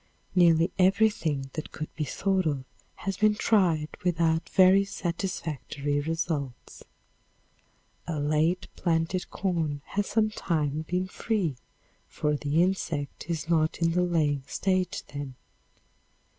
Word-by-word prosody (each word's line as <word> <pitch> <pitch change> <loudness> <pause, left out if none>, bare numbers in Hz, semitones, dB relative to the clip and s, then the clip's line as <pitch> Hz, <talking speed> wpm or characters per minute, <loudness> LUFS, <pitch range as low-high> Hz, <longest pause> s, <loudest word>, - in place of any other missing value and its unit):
Nearly 170 -1 +5
everything 180 -8 +2
that 155 - -5
could 155 - -6
be 155 - -2
thought 190 +5 0
of 140 -3 -1 0.3
has 195 -1 -4
been 215 +1 +4
tried 175 -9 +2
without 165 -2 +1
very 190 +1 +6
satisfactory 160 -6 -3
results. 150 -4 -3 1.2
A 160 -3 -2
late 155 +5 +1
planted 170 +2 0
corn 160 -7 -2
has 205 0 -2
sometimes 160 -9 0
been 180 +1 -1
free, 190 - -1 0.5
for 150 0 -1
the 150 +3 +2
insect 165 -5 -2
is 165 -2 -2
not 160 -2 +2
in 165 -1 +2
the 180 +2 +2
laying 155 -5 +1
stage 185 -1 0
then. 140 -2 -7
165 Hz, 115 wpm, -28 LUFS, 150-185 Hz, 1.2 s, very